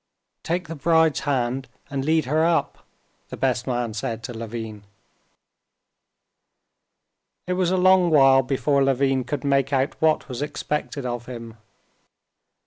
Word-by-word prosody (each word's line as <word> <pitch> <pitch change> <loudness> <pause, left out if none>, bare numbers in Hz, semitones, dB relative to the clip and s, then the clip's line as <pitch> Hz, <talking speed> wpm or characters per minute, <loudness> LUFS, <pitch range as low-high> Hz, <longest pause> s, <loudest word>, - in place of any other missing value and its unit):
"Take 175 +1 -2
the 165 - -5
bride's 160 0 +2
hand 130 -1 -1 0.2
and 135 -1 -2
lead 160 +1 +2
her 155 +5 +1
up," 165 0 0 0.4
the - - -7
best 130 -1 0
man 120 -3 -2
said 110 +2 -4
to 120 - -6
Levin. 110 -2 -6 2.6
It 180 - -1
was 180 -1 +1
a 185 - +1
long 185 -1 +5
while 135 -3 +6
before 140 +1 +1
Levin 135 -1 +1
could 145 +1 -4
make 140 -1 +1
out 135 +1 -1
what 160 -1 +2
was 125 -2 -6
expected 150 -1 -3
of 120 -1 -4
him. 115 -2 -8
135 Hz, 135 wpm, -23 LUFS, 125-155 Hz, 2.6 s, while